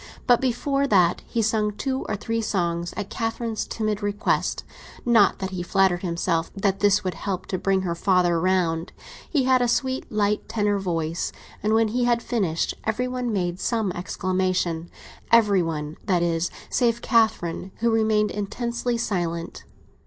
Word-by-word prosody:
But 245 -1 +4
before 275 +2 0
that 180 -7 +3
he 230 -2 0
sang 215 -1 +1
two 265 +5 -3
or 215 - 0
three 225 +3 -2
songs 175 -5 -1
at 205 -2 -4
Catherine's 225 -1 -2
timid 215 -2 -2
request; 205 +1 0 0.4
not 225 -5 +5
that 190 0 -4
he 185 -2 -4
flattered 180 0 +2
himself 170 -2 -1
that 195 -1 0
this 205 0 +3
would 185 -1 -2
help 190 +1 -4
to 185 - -3
bring 190 -1 +1
her 175 -2 -1
father 175 -1 +2
round. 170 -2 0 0.4
He 285 -5 +2
had 255 0 +4
a 245 - +3
sweet, 260 +2 -1
light 210 0 0
tenor 205 -2 +1
voice, 165 -3 -2 0.3
and 215 +2 +2
when 225 -1 +3
he 245 +2 0
had 235 -1 +2
finished 190 -9 0
every 220 +3 -1
one 250 -1 -2
made 180 -3 -1
some 220 -4 0
exclamation—every 185 +3 0
one, 155 -2 -3
that 180 -3 +2
is, 165 0 0 0.2
save 235 -1 +1
Catherine, 195 -6 +1
who 235 0 +3
remained 220 -1 +2
intensely 235 +3 -2
silent. 175 -6 -3
205 Hz, 160 wpm, -24 LUFS, 175-230 Hz, 0.4 s, not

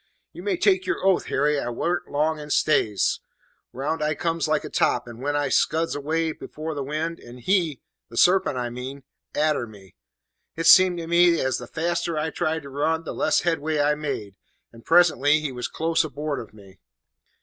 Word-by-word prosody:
"You - - -9
may 390 -4 -1
take 380 0 +2
your 380 - -2
oath, 190 -2 +3
Harry, 145 +1 +1
I 120 - -3
warn't 170 +8 -2
long 155 +2 0
in 150 0 -9
stays. 110 -9 +2 0.5
Round 150 +5 -3
I 150 0 0
comes 165 0 -1
like 155 - +1
a - - -6
top, 125 - +1
and 120 -1 -10
away 140 +3 -1
I 145 -1 0
scuds 160 +4 +1
dead 160 +3 -1
afore 155 +1 -6
the 145 - -4
wind; 155 +4 -3
and 120 +1 -12
he 170 -2 0 0.3
the 115 - -10
sarpent, 180 -5 +4
I 120 -1 -3
mean 130 +3 -7 0.3
arter 150 -5 +1
me. 100 -4 -15 0.6
It 165 - -3
seemed 185 -1 +7
to 170 - -5
me 170 0 +4
as 130 0 0
the 125 - -8
faster 170 +1 -2
I 155 +1 -1
tried 160 -2 -2
to 140 - -9
run, 160 +4 0
the - - -6
less 200 +2 +1
headway 160 -3 -1
I 145 +1 +3
made; 140 -10 -4 0.4
and 115 0 -15
presently 160 -3 +4
he 150 -3 -3
was 125 -1 -4
close 165 +1 0
aboard 150 -1 -4
of 110 - -9
me. 100 -2 -17
155 Hz, 195 wpm, -24 LUFS, 135-165 Hz, 0.6 s, seemed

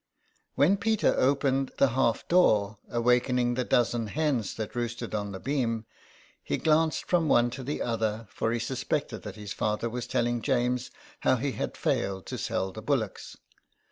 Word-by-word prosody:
When 175 +8 +4
Peter 220 +1 +2
opened 135 0 +1
the 140 - +4
half 120 -1 +1
door, 105 - +3
awaking 125 +1 +2
the 125 +1 0
dozen 120 -2 +1
hens 135 -5 -1
that 110 -2 -5
roosted 120 -1 -3
on 100 -1 -2
the 95 - -6
beam, 115 -5 -1 0.6
he - - -2
glanced 160 0 +2
from 170 -3 +2
one 120 -1 +4
to 130 - -6
the 140 +4 -3
other, 110 -1 -1
for 115 - -1
he 120 - 0
suspected 130 0 -2
that 105 -2 -8
his 105 -2 -6
father 105 +2 -1
was 125 0 -4
telling 120 -1 0
James 125 -1 0 0.3
how 130 - +3
he 135 +3 -1
had - - -4
failed 95 -2 -1
to - - -5
sell 95 - -1
the 110 - -8
bullocks. 115 -5 -2
120 Hz, 170 wpm, -28 LUFS, 110-135 Hz, 0.6 s, When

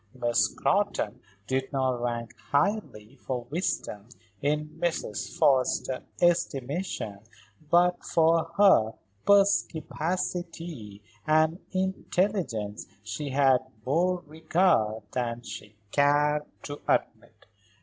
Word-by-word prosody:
Miss 120 -2 +2
Scrotton - - 0 0.3
did 130 +3 -1
not 130 -3 0
rank 120 -1 -3
highly 140 - -1
for 125 -2 -4
wisdom 120 - -3 0.3
in 150 +1 0
Mrs. 125 - -2
Forrester's 130 -1 +2 0.2
estimation; 145 - 0 0.5
but 175 +2 +3
for 165 0 +3
her 190 - +5 0.3
perspicacity 170 - 0 0.2
and 155 +2 +3
intelligence 185 - -1 0.2
she 150 -2 -4
had 135 -1 +4 0.3
more 175 +6 +1
regard 155 - +1
than 120 -1 -2
she 105 -1 -9 0.2
cared 145 +1 +3 0.2
to 145 0 -7
admit. - - -1
145 Hz, 90 wpm, -27 LUFS, 120-175 Hz, 0.5 s, her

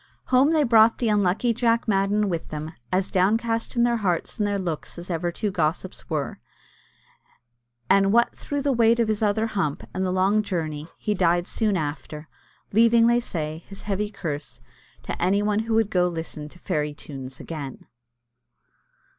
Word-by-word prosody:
Home 265 +4 +5
they 315 -2 +3
brought 225 -3 +5
the 235 - 0
unlucky 210 +3 +2
Jack 230 0 +1
Madden 205 +1 +2
with 170 -4 -3
them, 155 +1 -5 0.2
as 185 +1 0
downcast 225 +6 +1
in 235 - +3
their 240 0 +2
hearts 190 +1 -1
and 210 - +2
their 205 0 0
looks 175 -5 -4
as 175 +2 -7
ever 170 +1 -1
two 205 +4 -2
gossips 170 +2 -2
were; 150 -4 -3 1.5
and 195 +3 +4
what 235 +2 +3
through 285 -1 -4
the 280 - +2
weight 230 -1 +4
of 230 - +3
his 215 0 0
other 215 +1 +2
hump, 190 -10 -2
and 185 - -1
the 185 - 0
long 190 +3 +2
journey, 160 -6 -3
he 210 - -1
died 175 -2 +2
soon 210 -2 0
after, 150 0 -5 0.5
leaving, 230 +1 +5
they 235 +1 +4
say, 160 -7 -4
his 195 - -9
heavy 205 0 -1
curse 155 - -6 0.4
to - - -5
any 195 +4 +2
one 210 0 +1
who 225 0 -1
would 225 -2 +2
go 180 -1 +3
to 170 - -7
listen 155 -2 -5
to 175 - -16
fairy 150 -5 -2
tunes 135 -3 -9
again. 145 -5 -7
195 Hz, 180 wpm, -24 LUFS, 165-225 Hz, 1.5 s, Home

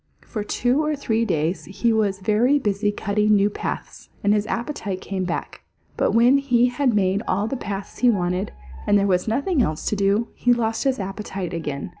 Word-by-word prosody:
For 215 -3 -4
two 250 +7 +1
or 305 0 0
three 230 -5 0
days 160 -2 -1
he 225 +4 0
was 200 -3 0
very 220 +8 +3
busy 205 -4 0
cutting 210 +1 +1
new 205 +1 +3
paths, - - -6
and 205 0 +4
his 210 0 0
appetite 230 -6 -3
came 190 -1 -3
back. 175 - -4 0.3
But - - +1
when 245 +4 +5
he 250 -3 +3
had 250 -2 +1
made 195 0 +2
all 200 +3 +1
the 225 - -2
paths 200 -5 -6
he 250 - +5
wanted, 180 -2 0 0.4
and 205 - +5
there 200 - +2
was 180 -1 +1
nothing 280 - +1
else 155 -8 -1
to - - 0
do, 200 +3 +1
he 245 - +2
lost 225 +1 -1
his 265 -2 +1
appetite 195 -2 -5
again. 150 -2 -4
210 Hz, 195 wpm, -23 LUFS, 195-240 Hz, 0.4 s, when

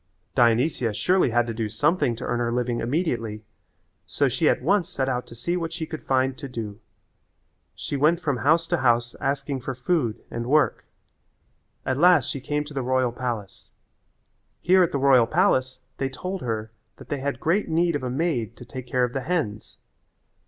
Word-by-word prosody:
Dionysia 120 -1 +2
surely 180 - +2
had 120 0 +2
to 115 - -4
do 110 -1 -2
something 135 - +1
to - - -8
earn 120 - -1
her 120 -1 0
living 120 -1 -1
immediately, 115 - -2 0.6
so - - +1
she - - +2
at - - 0
once 180 +2 +2
set 135 -8 -2
out 125 -2 -2
to 115 - -12
see 170 +10 -2
what 165 -2 -2
she 165 -1 -4
could 155 0 -7
find 130 0 +1
to 140 - -6
do. 110 -4 -6 1.0
She - - -4
went 155 +5 +3
from 145 -7 -1
house 160 +6 +3
to 175 - +2
house 120 -2 +2
asking 140 -1 -2
for 130 +1 -4
food 125 -3 -1
and 120 0 -4
work. 150 +3 +2 1.0
At 130 +1 -1
last 175 -5 +5
she 140 - -5
came 150 +2 -1
to 150 0 -11
the 135 - -2
royal 130 -1 +1
palace. 120 -5 -5 0.9
Here 185 +1 +4
at 175 - +3
the - - 0
royal 130 -4 +5
palace 130 +2 +1 0.2
they 135 - 0
told 185 +8 -5
her 110 -2 -3 0.2
that - - -14
they 145 - -2
had 140 +1 -3
great 180 +5 +1
need 170 0 +2
of 145 - -2
a 130 - -3
maid 125 -6 -1
to 125 - -11
take 130 -1 -8
care 125 -1 +1
of 125 0 -1
the 135 - -2
hens. 140 -11 -3
130 Hz, 195 wpm, -25 LUFS, 120-155 Hz, 1.0 s, last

